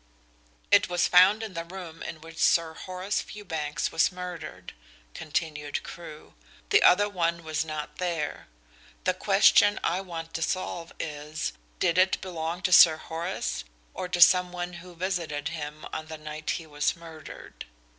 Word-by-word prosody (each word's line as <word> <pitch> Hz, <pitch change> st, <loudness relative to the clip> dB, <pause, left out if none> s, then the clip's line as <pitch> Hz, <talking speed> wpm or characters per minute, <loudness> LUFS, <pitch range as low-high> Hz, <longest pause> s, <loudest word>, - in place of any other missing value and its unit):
"It -, -, +5 dB
was 175 Hz, 0 st, +2 dB
found 190 Hz, +5 st, +6 dB
in 215 Hz, -3 st, -6 dB
the 165 Hz, -1 st, -4 dB
room 170 Hz, -2 st, -9 dB
in 160 Hz, -, -7 dB
which 165 Hz, 0 st, -11 dB
Sir 165 Hz, -1 st, +3 dB
Horace 185 Hz, +4 st, -3 dB
Fewbanks 160 Hz, -8 st, -4 dB
was 160 Hz, -, +3 dB
murdered," 180 Hz, -2 st, -8 dB, 0.4 s
continued 150 Hz, -1 st, -3 dB
Crewe. 155 Hz, -2 st, -10 dB, 0.4 s
"The -, -, +6 dB
other 205 Hz, +3 st, +6 dB
one 170 Hz, -4 st, -1 dB
was 155 Hz, -1 st, -1 dB
not 155 Hz, -1 st, -6 dB
there. 170 Hz, -5 st, -3 dB, 0.6 s
The -, -, +2 dB
question 205 Hz, 0 st, +5 dB
I 180 Hz, +3 st, +1 dB
want 165 Hz, -3 st, -7 dB
to 165 Hz, -, -3 dB
solve 170 Hz, -1 st, -2 dB
is, 150 Hz, 0 st, -4 dB, 0.2 s
did 180 Hz, 0 st, +2 dB
it 185 Hz, +1 st, +3 dB
belong 170 Hz, 0 st, -4 dB
to 185 Hz, -, +1 dB
Sir 165 Hz, -3 st, +8 dB
Horace, 170 Hz, +4 st, -4 dB, 0.3 s
or 180 Hz, -, -4 dB
to 180 Hz, -1 st, -2 dB
some 180 Hz, +1 st, +7 dB
one 175 Hz, 0 st, -5 dB
who 180 Hz, -1 st, -13 dB
visited 170 Hz, -5 st, -2 dB
him 155 Hz, -2 st, -6 dB
on 155 Hz, -, -4 dB
the 160 Hz, 0 st, -7 dB
night 155 Hz, 0 st, -7 dB
he 165 Hz, -, -9 dB
was 145 Hz, -1 st, -1 dB
murdered? 165 Hz, -2 st, -11 dB
170 Hz, 155 wpm, -27 LUFS, 155-180 Hz, 0.6 s, Sir